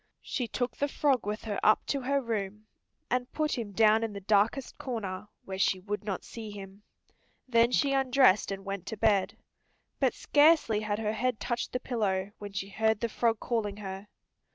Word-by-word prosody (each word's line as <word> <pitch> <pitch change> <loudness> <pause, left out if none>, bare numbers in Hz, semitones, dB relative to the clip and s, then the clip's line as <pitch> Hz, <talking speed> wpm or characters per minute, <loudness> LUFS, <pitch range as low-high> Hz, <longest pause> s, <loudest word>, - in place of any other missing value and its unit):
She 250 -3 -2
took 245 +2 -2
the 285 - 0
frog 275 -6 +1
with 210 +1 -3
her 210 -3 -3
up 215 - +4
to 275 - -1
her 280 +2 +1
room, 210 -2 -3 0.5
and 250 +1 0
put 305 -1 0
him 225 -5 -4
down 220 +2 +4
in 225 -2 -3
the 200 - -5
darkest 215 +6 +1
corner, 210 -6 -4 0.2
where 190 0 -5
she 190 -1 +2
would 205 +3 -4
not 200 -3 -3
see 225 -2 -8
him. 200 -1 -10 0.7
Then 235 -1 +4
she 275 +2 +2
undressed 260 -6 +4
and 195 0 -5
went 195 -2 -5
to 220 - -5
bed. 205 -3 +2 0.6
But - - +2
scarcely 290 -7 +4
had 210 -1 -2
her 215 -1 -1
head 245 +1 -1
touched 240 -1 -2
the 250 - -1
pillow 205 -6 -1
when 205 -1 -7
she 195 0 -4
heard 220 +1 +1
the 235 - -1
frog 225 0 +1
calling 210 -4 -2
her. 195 0 -7
215 Hz, 190 wpm, -29 LUFS, 200-245 Hz, 0.7 s, up